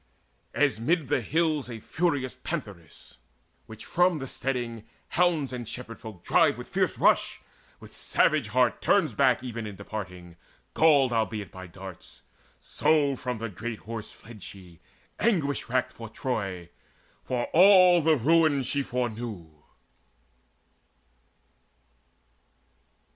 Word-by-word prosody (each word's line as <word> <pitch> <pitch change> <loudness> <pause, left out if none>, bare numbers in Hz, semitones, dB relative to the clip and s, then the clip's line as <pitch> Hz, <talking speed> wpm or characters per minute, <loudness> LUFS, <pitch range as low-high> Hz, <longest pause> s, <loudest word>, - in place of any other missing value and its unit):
As 145 -6 +2
mid 150 +3 0
the 145 -3 +2
hills 155 +1 0
a 115 -2 -6
furious 140 -2 -1
pantheress, 100 - -7 0.5
Which 110 0 -11
from 175 -1 +2
the 135 -2 -5
steading 120 -5 -3 0.3
hounds 165 -7 +1
and 120 -2 -5
shepherd 120 -2 -8
folk 105 -6 -10
Drive - - +3
with - - -9
fierce - - 0
rush, - - +2 0.4
with - - -14
savage 150 -7 +2
heart 125 +2 +1
turns 165 - +2
back 130 +2 +3
Even 115 -3 -5
in 105 - -8
departing, 90 -4 -8 0.4
galled 145 -6 +4
albeit 110 -2 -2
by 95 0 -9
darts: 95 0 -11 0.4
So 150 -2 +1
from 125 -3 -4
the 115 +1 -4
great 110 +3 -6
Horse 115 -1 -7
fled 110 -2 -14
she, 90 -3 -12 0.4
anguish 155 - 0
racked 130 +1 0
For 115 -1 -10
Troy, 100 -8 -4 0.5
for 125 -1 -2
all 180 -1 +7
the 160 0 +4
ruin 155 +1 +3
she 140 +3 0
foreknew. 115 - -4
125 Hz, 125 wpm, -27 LUFS, 110-150 Hz, 0.5 s, all